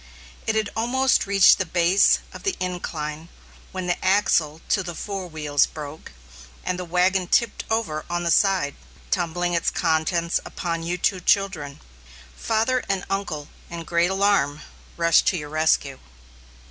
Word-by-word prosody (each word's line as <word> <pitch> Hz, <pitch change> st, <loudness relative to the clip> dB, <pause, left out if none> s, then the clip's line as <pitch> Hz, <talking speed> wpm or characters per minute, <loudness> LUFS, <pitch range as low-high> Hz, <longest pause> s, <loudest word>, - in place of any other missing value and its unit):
It 220 Hz, -, +1 dB
had 220 Hz, -1 st, 0 dB
almost 255 Hz, +2 st, +2 dB
reached 195 Hz, -1 st, +6 dB
the -, -, +2 dB
base 175 Hz, +3 st, +3 dB
of -, -, -9 dB
the 390 Hz, -, -1 dB
incline 165 Hz, -3 st, -4 dB, 0.4 s
when 185 Hz, -1 st, -4 dB
the 175 Hz, -1 st, -2 dB
axle 185 Hz, -6 st, +2 dB
to 200 Hz, -, +2 dB
the 175 Hz, -2 st, -6 dB
fore 195 Hz, -1 st, -5 dB
wheels 150 Hz, -3 st, +1 dB
broke, 150 Hz, 0 st, -9 dB, 0.5 s
and 180 Hz, 0 st, -2 dB
the 180 Hz, -, -4 dB
wagon 180 Hz, +2 st, +1 dB
tipped 235 Hz, +4 st, +1 dB
over 220 Hz, -9 st, -1 dB
on 175 Hz, 0 st, -2 dB
the 170 Hz, -, +1 dB
side, 190 Hz, -8 st, +2 dB, 0.4 s
tumbling 175 Hz, 0 st, 0 dB
its 170 Hz, -, +1 dB
contents 170 Hz, +2 st, 0 dB
upon 170 Hz, -2 st, -4 dB
you 175 Hz, +2 st, -2 dB
two 185 Hz, +1 st, 0 dB
children. 180 Hz, -7 st, 0 dB, 0.5 s
Father 230 Hz, +3 st, 0 dB
and 195 Hz, -1 st, -1 dB
uncle, 155 Hz, -7 st, -3 dB, 0.2 s
in 170 Hz, -1 st, -6 dB
great 170 Hz, +1 st, +1 dB
alarm, 190 Hz, -7 st, +1 dB, 0.4 s
rushed 170 Hz, -1 st, +4 dB
to 185 Hz, -, +2 dB
your 150 Hz, -2 st, -6 dB
rescue. 155 Hz, -3 st, +1 dB
175 Hz, 150 wpm, -23 LUFS, 160-195 Hz, 0.5 s, reached